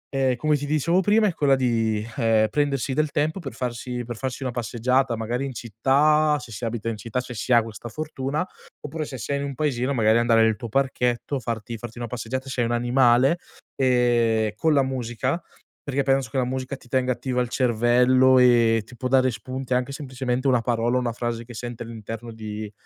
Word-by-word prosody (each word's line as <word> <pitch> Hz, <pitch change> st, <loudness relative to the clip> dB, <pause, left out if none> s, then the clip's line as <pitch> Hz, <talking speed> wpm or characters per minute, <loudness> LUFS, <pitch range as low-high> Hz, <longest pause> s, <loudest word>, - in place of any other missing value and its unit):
ehm, 130 Hz, -2 st, +2 dB
come 155 Hz, +3 st, +2 dB
ti 145 Hz, -, -5 dB
dicevo 155 Hz, +5 st, +2 dB
prima, 210 Hz, +3 st, +3 dB
è 190 Hz, -, 0 dB
quella 140 Hz, -4 st, +3 dB
di, 115 Hz, -4 st, 0 dB
ehm, 115 Hz, -3 st, +3 dB
prendersi 140 Hz, 0 st, 0 dB
del 155 Hz, +2 st, 0 dB
tempo 155 Hz, +6 st, 0 dB
per 135 Hz, -5 st, -6 dB
farsi 120 Hz, +1 st, -4 dB
per 120 Hz, 0 st, -6 dB
farsi 130 Hz, +2 st, -4 dB
una 130 Hz, -, -2 dB
passeggiata, 120 Hz, +1 st, 0 dB
magari 120 Hz, +4 st, -2 dB
in 135 Hz, -, -5 dB
città, 145 Hz, +7 st, +2 dB
se 125 Hz, -, -11 dB
si 105 Hz, -, -8 dB
abita 115 Hz, -1 st, -4 dB
in 115 Hz, -, -3 dB
città, 115 Hz, +4 st, -3 dB
se 125 Hz, 0 st, -8 dB
si 115 Hz, -, -4 dB
ha 120 Hz, -, +7 dB
questa 115 Hz, +1 st, -8 dB
fortuna, 150 Hz, +3 st, -3 dB, 0.4 s
oppure 155 Hz, +2 st, -4 dB
se 135 Hz, -, -7 dB
sei 140 Hz, +5 st, -2 dB
in -, -, -3 dB
un 140 Hz, -1 st, -5 dB
paesino, 135 Hz, -2 st, 0 dB
magari 110 Hz, -3 st, +3 dB
andare 115 Hz, -1 st, +4 dB
nel 110 Hz, -1 st, +3 dB
tuo 120 Hz, -, -6 dB
parchetto, 130 Hz, +1 st, 0 dB
farti 115 Hz, -1 st, -4 dB
farti 120 Hz, +1 st, -9 dB
una 120 Hz, -, -4 dB
passeggiata 125 Hz, +3 st, -4 dB
se 130 Hz, -, -4 dB
hai 115 Hz, -, +1 dB
un 120 Hz, -, -1 dB
animale, 125 Hz, +5 st, +3 dB, 0.4 s
ehm, 120 Hz, -4 st, +2 dB
con 160 Hz, +7 st, +2 dB
la 140 Hz, -2 st, +4 dB
musica, 130 Hz, +4 st, -2 dB, 0.4 s
perché 140 Hz, 0 st, -1 dB
penso 135 Hz, -3 st, +1 dB
che -, -, -13 dB
la 130 Hz, -, +3 dB
musica 130 Hz, +2 st, -3 dB
ti 125 Hz, -, -19 dB
tenga 130 Hz, 0 st, +1 dB
attiva 125 Hz, 0 st, -3 dB
al 125 Hz, -, -1 dB
cervello, 125 Hz, +2 st, +4 dB
e 120 Hz, -2 st, +5 dB
ti 120 Hz, -, -14 dB
può 130 Hz, -, -2 dB
dare 130 Hz, 0 st, +4 dB
spunti, 130 Hz, +3 st, -5 dB
anche 125 Hz, +2 st, 0 dB
semplicemente 130 Hz, -2 st, -3 dB
una 125 Hz, -2 st, +4 dB
parola, 120 Hz, +1 st, 0 dB
o -, -, +3 dB
una 120 Hz, -2 st, -2 dB
frase 120 Hz, 0 st, -3 dB
che 120 Hz, -, -11 dB
sente 120 Hz, 0 st, -6 dB
all'interno 115 Hz, 0 st, -7 dB
di 110 Hz, -1 st, -6 dB
125 Hz, 210 wpm, -24 LUFS, 115-135 Hz, 0.4 s, ha